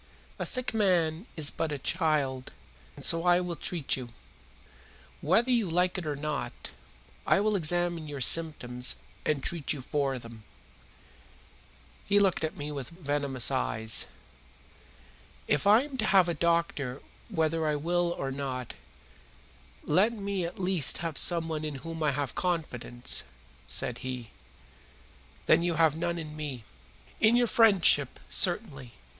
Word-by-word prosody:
A -, -, +2 dB
sick 255 Hz, -3 st, +2 dB
man 180 Hz, -3 st, +1 dB
is 150 Hz, -2 st, +2 dB
but 165 Hz, -2 st, -3 dB
a 145 Hz, -, -3 dB
child, 145 Hz, -5 st, -1 dB, 0.4 s
and -, -, -7 dB
so 165 Hz, 0 st, +3 dB
I 175 Hz, 0 st, +4 dB
will 180 Hz, -1 st, -4 dB
treat 165 Hz, -2 st, 0 dB
you. 125 Hz, -2 st, -7 dB, 1.1 s
Whether 225 Hz, -, +3 dB
you 230 Hz, -7 st, +1 dB
like 180 Hz, +2 st, +1 dB
it 170 Hz, -, -6 dB
or 150 Hz, -, -2 dB
not, 145 Hz, -3 st, -5 dB, 0.6 s
I -, -, +4 dB
will 210 Hz, +1 st, +1 dB
examine 175 Hz, -2 st, 0 dB
your 145 Hz, -1 st, -6 dB
symptoms 125 Hz, -4 st, +3 dB, 0.3 s
and 145 Hz, -3 st, 0 dB
treat 165 Hz, -4 st, 0 dB
you 145 Hz, -, -7 dB
for 135 Hz, -1 st, -1 dB
them." 115 Hz, -2 st, -11 dB, 1.6 s
He 200 Hz, -, +3 dB
looked 195 Hz, -5 st, +2 dB
at 160 Hz, -, -3 dB
me 145 Hz, +1 st, -5 dB
with 140 Hz, -4 st, -6 dB
venomous 145 Hz, -6 st, -1 dB
eyes. 85 Hz, -, +1 dB, 1.4 s
"If 145 Hz, +6 st, +1 dB
I 215 Hz, +3 st, +7 dB
am 280 Hz, -1 st, -7 dB
to 220 Hz, -, 0 dB
have 190 Hz, -3 st, +5 dB
a 170 Hz, -, 0 dB
doctor 165 Hz, -5 st, -1 dB, 0.3 s
whether 160 Hz, 0 st, 0 dB
I 150 Hz, -, +1 dB
will 175 Hz, +3 st, 0 dB
or 135 Hz, -, -3 dB
not, 130 Hz, -3 st, -5 dB, 1.1 s
let 190 Hz, +9 st, +2 dB
me 200 Hz, -4 st, -3 dB
at 170 Hz, -, -7 dB
least 180 Hz, -6 st, +3 dB
have 165 Hz, -3 st, -3 dB
someone 160 Hz, -2 st, +1 dB
in 150 Hz, -2 st, -4 dB
whom 165 Hz, -1 st, -6 dB
I 155 Hz, -, +2 dB
have 140 Hz, -1 st, -3 dB
confidence," 130 Hz, -8 st, -2 dB, 0.5 s
said -, -, -1 dB
he. 125 Hz, -3 st, -6 dB, 1.1 s
"Then -, -, +4 dB
you 170 Hz, -1 st, 0 dB
have 160 Hz, -2 st, +3 dB
none 170 Hz, +1 st, -2 dB
in 155 Hz, -2 st, -7 dB
me?" 145 Hz, -6 st, -6 dB, 0.6 s
"In 220 Hz, +2 st, +4 dB
your 245 Hz, 0 st, +4 dB
friendship, 195 Hz, -, +4 dB
certainly. 150 Hz, -, +1 dB
160 Hz, 145 wpm, -28 LUFS, 140-180 Hz, 1.6 s, I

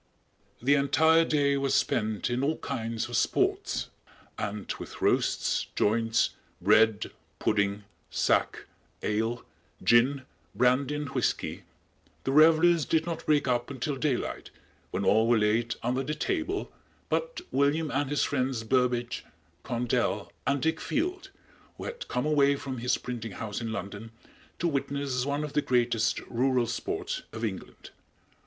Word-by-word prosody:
The 140 Hz, +3 st, +4 dB
entire 160 Hz, +4 st, +4 dB
day 145 Hz, -3 st, +2 dB
was 135 Hz, 0 st, +1 dB
spent 110 Hz, +1 st, 0 dB
in 125 Hz, +2 st, 0 dB
all 155 Hz, +3 st, +1 dB
kinds 115 Hz, -1 st, -3 dB
of -, -, -5 dB
sports, -, -, 0 dB, 0.5 s
and 105 Hz, -1 st, -4 dB
with -, -, -9 dB
roasts, -, -, +1 dB
joints, 115 Hz, +2 st, +2 dB, 0.3 s
bread, 105 Hz, +3 st, +3 dB, 0.3 s
pudding, 100 Hz, 0 st, 0 dB, 0.3 s
sack, -, -, +1 dB, 0.4 s
ale, 115 Hz, +3 st, -1 dB, 0.4 s
gin, 130 Hz, +4 st, +4 dB, 0.3 s
brandy 130 Hz, +3 st, +2 dB
and 150 Hz, -2 st, -3 dB
whiskey, -, -, -2 dB, 0.6 s
the 135 Hz, -, -1 dB
revelers 160 Hz, +2 st, +6 dB
did 160 Hz, +2 st, +1 dB
not 165 Hz, -1 st, -5 dB
break 145 Hz, -2 st, +3 dB
up 120 Hz, -1 st, 0 dB
until 140 Hz, +1 st, -3 dB
daylight, 135 Hz, -2 st, -2 dB, 0.4 s
when 100 Hz, +2 st, -2 dB
all 110 Hz, +2 st, +4 dB
were 120 Hz, 0 st, +4 dB
laid 110 Hz, +3 st, +1 dB
under 125 Hz, +3 st, 0 dB
the 150 Hz, +3 st, -3 dB
table 380 Hz, -, -2 dB, 0.4 s
but -, -, -1 dB
William 145 Hz, +2 st, +1 dB
and 145 Hz, 0 st, 0 dB
his 145 Hz, -, +1 dB
friends 130 Hz, -4 st, -1 dB
Burbage, 120 Hz, 0 st, 0 dB, 0.4 s
Condell 120 Hz, -2 st, -1 dB, 0.2 s
and 140 Hz, -1 st, +1 dB
Dick 160 Hz, 0 st, 0 dB
Field, 365 Hz, +5 st, -2 dB, 0.5 s
who -, -, -7 dB
had 485 Hz, 0 st, -6 dB
come 125 Hz, -, -1 dB
away 140 Hz, -2 st, +4 dB
from 135 Hz, -3 st, -5 dB
his 125 Hz, +1 st, +1 dB
printing 115 Hz, -4 st, -6 dB
house 105 Hz, +3 st, -5 dB
in 115 Hz, -1 st, -3 dB
London 105 Hz, +1 st, -6 dB, 0.5 s
to 175 Hz, -, 0 dB
witness 140 Hz, -3 st, -1 dB
one 145 Hz, +1 st, -1 dB
of 150 Hz, -1 st, -5 dB
the 150 Hz, -, +2 dB
greatest 120 Hz, -4 st, +1 dB
rural 125 Hz, 0 st, +1 dB
sports -, -, -3 dB
of 110 Hz, 0 st, -3 dB
England. 95 Hz, -4 st, -7 dB
130 Hz, 140 wpm, -28 LUFS, 115-145 Hz, 0.6 s, revelers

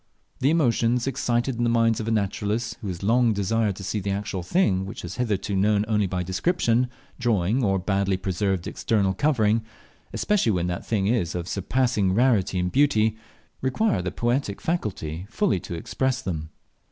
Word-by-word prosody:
The 135 Hz, -, +3 dB
emotions 120 Hz, -6 st, +2 dB
excited 120 Hz, -1 st, 0 dB
in 120 Hz, -, 0 dB
the 120 Hz, -, +2 dB
minds 115 Hz, -1 st, +3 dB
of 110 Hz, -, -4 dB
a -, -, 0 dB
naturalist, 105 Hz, +2 st, -1 dB
who 105 Hz, -, -5 dB
has 90 Hz, -1 st, -5 dB
long 115 Hz, +2 st, +3 dB
desired 105 Hz, +1 st, 0 dB
to 95 Hz, -, -8 dB
see 100 Hz, +3 st, -2 dB
the 100 Hz, 0 st, -3 dB
actual 100 Hz, -1 st, -2 dB
thing 95 Hz, -, +1 dB
which 100 Hz, -, -7 dB
he -, -, -7 dB
has 90 Hz, +4 st, -7 dB
hitherto 105 Hz, -4 st, -1 dB
known 105 Hz, +2 st, +2 dB
only 105 Hz, -2 st, +1 dB
by 90 Hz, -1 st, -2 dB
description, 120 Hz, -, +1 dB, 0.3 s
drawing, 115 Hz, 0 st, +1 dB
or 95 Hz, -2 st, +2 dB
badly 95 Hz, 0 st, 0 dB
preserved 95 Hz, -1 st, -1 dB
external 100 Hz, -4 st, 0 dB
covering 115 Hz, -5 st, +2 dB, 0.5 s
especially 195 Hz, -, +1 dB
when 90 Hz, -2 st, 0 dB
that 90 Hz, 0 st, -4 dB
thing 105 Hz, -4 st, 0 dB
is 100 Hz, -7 st, 0 dB
of 85 Hz, -1 st, -3 dB
surpassing 100 Hz, -1 st, +1 dB
rarity 110 Hz, -6 st, +2 dB
and 90 Hz, 0 st, 0 dB
beauty, 110 Hz, -6 st, +3 dB, 0.5 s
require 130 Hz, -, +1 dB
the 90 Hz, -, -2 dB
poetic 120 Hz, 0 st, -1 dB
faculty 95 Hz, -, -3 dB
fully 185 Hz, -, +1 dB
to 85 Hz, -, -6 dB
express 130 Hz, +9 st, -1 dB
them. 80 Hz, -4 st, -4 dB
105 Hz, 175 wpm, -25 LUFS, 95-120 Hz, 0.5 s, The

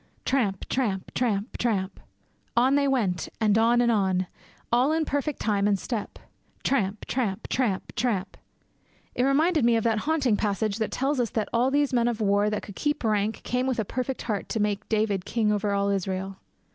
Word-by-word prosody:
Tramp! 225 Hz, -8 st, 0 dB
tramp! 210 Hz, -8 st, -1 dB
tramp! 220 Hz, -3 st, -1 dB
tramp! 200 Hz, -5 st, -1 dB, 0.6 s
On 255 Hz, +3 st, +4 dB
they 280 Hz, 0 st, +3 dB
went, 215 Hz, -10 st, 0 dB
and 215 Hz, -2 st, +3 dB
on, 230 Hz, +2 st, +4 dB
and 235 Hz, -1 st, +3 dB
on; 190 Hz, -4 st, +1 dB, 0.5 s
all 250 Hz, +5 st, +3 dB
in 320 Hz, 0 st, +1 dB
perfect 285 Hz, 0 st, -2 dB
time 205 Hz, -2 st, +1 dB
and 205 Hz, -1 st, +2 dB
step; 215 Hz, +1 st, -4 dB, 0.5 s
tramp! 210 Hz, -6 st, 0 dB
tramp! 225 Hz, -5 st, -2 dB
tramp! 230 Hz, -7 st, -1 dB
tramp! 210 Hz, -6 st, -1 dB, 0.8 s
It -, -, -1 dB
reminded 305 Hz, +2 st, +3 dB
me 235 Hz, 0 st, +4 dB
of 225 Hz, -, +1 dB
that 225 Hz, -2 st, +2 dB
haunting 280 Hz, -6 st, +1 dB
passage 210 Hz, 0 st, -1 dB
that 220 Hz, -, 0 dB
tells 270 Hz, +1 st, -1 dB
us 240 Hz, -2 st, +1 dB
that 220 Hz, -2 st, -2 dB
'all 240 Hz, +3 st, +3 dB
these 285 Hz, 0 st, +1 dB
men 240 Hz, -1 st, +3 dB
of 235 Hz, -2 st, -1 dB
war 205 Hz, 0 st, +2 dB
that 210 Hz, -, -3 dB
could 200 Hz, -, -10 dB
keep 295 Hz, -2 st, -1 dB
rank 215 Hz, -1 st, 0 dB
came 250 Hz, +1 st, -1 dB
with 260 Hz, -, 0 dB
a 220 Hz, -, 0 dB
perfect 255 Hz, +4 st, -3 dB
heart 210 Hz, -4 st, -3 dB
to 225 Hz, -, -1 dB
make 210 Hz, 0 st, -1 dB
David 210 Hz, -4 st, +1 dB
king 215 Hz, +1 st, 0 dB
over 205 Hz, 0 st, 0 dB
all 200 Hz, 0 st, +1 dB
Israel.' 190 Hz, 0 st, -2 dB
225 Hz, 190 wpm, -26 LUFS, 200-255 Hz, 0.8 s, On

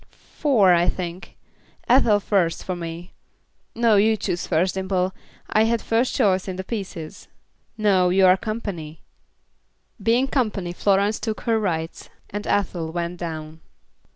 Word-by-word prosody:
"Four, 225 Hz, -, +4 dB
I 175 Hz, 0 st, +3 dB
think. 180 Hz, 0 st, -6 dB, 0.5 s
Ethel 235 Hz, -4 st, +5 dB
first, 190 Hz, -5 st, 0 dB
for 185 Hz, -, -3 dB
me. 170 Hz, 0 st, -7 dB, 0.6 s
No, 230 Hz, -2 st, +4 dB
you 220 Hz, +2 st, +3 dB
choose 175 Hz, -3 st, -3 dB
first, 180 Hz, +2 st, +1 dB
Dimple. 190 Hz, -1 st, -1 dB, 0.3 s
I 215 Hz, +1 st, +3 dB
had 230 Hz, +1 st, +1 dB
first 230 Hz, +3 st, 0 dB
choice 190 Hz, -2 st, +2 dB
in 185 Hz, -, -4 dB
the 190 Hz, -, -5 dB
pieces." 190 Hz, -7 st, -6 dB, 0.5 s
"No, 195 Hz, -4 st, +3 dB
you're 185 Hz, 0 st, +5 dB
company." 190 Hz, -7 st, -6 dB, 1.0 s
Being 235 Hz, +5 st, +2 dB
company, 210 Hz, -10 st, -1 dB
Florence 200 Hz, +3 st, +1 dB
took 220 Hz, -2 st, -4 dB
her 225 Hz, -2 st, +1 dB
rights, 165 Hz, -5 st, -3 dB, 0.2 s
and 205 Hz, +1 st, -5 dB
Ethel 175 Hz, -5 st, -1 dB
went 170 Hz, +1 st, -3 dB
down. 160 Hz, -2 st, -6 dB
190 Hz, 135 wpm, -23 LUFS, 175-215 Hz, 1.0 s, Ethel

